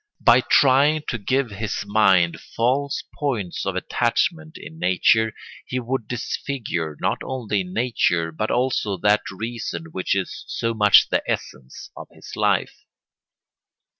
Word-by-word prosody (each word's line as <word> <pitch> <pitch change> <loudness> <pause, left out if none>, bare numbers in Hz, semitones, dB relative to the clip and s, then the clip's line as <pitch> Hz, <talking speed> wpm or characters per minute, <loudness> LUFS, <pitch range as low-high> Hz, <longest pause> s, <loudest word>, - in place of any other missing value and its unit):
By 120 +2 +6
trying 145 +4 +4
to 120 - -3
give 130 +3 0
his 105 0 -3
mind 95 -5 +3
false 135 +4 -1 0.2
points 110 - -2
of 95 - -1
attachment 155 - -1
in 160 - -11
nature 110 - +3 0.4
he 125 - -2
would 125 -2 -3
disfigure 110 - -4
not - - -1
only 110 -7 -2
nature 90 -5 0
but 105 +7 -3
also 120 -5 0
that 105 +2 +3
reason 95 -6 -5
which 95 +2 -1
is 95 -1 -4
so 115 0 -2
much 105 -2 +5
the - - +1
essence 65 0 -5
of - - -9
his - - -12
life. - - 0
110 Hz, 135 wpm, -22 LUFS, 95-130 Hz, 0.4 s, By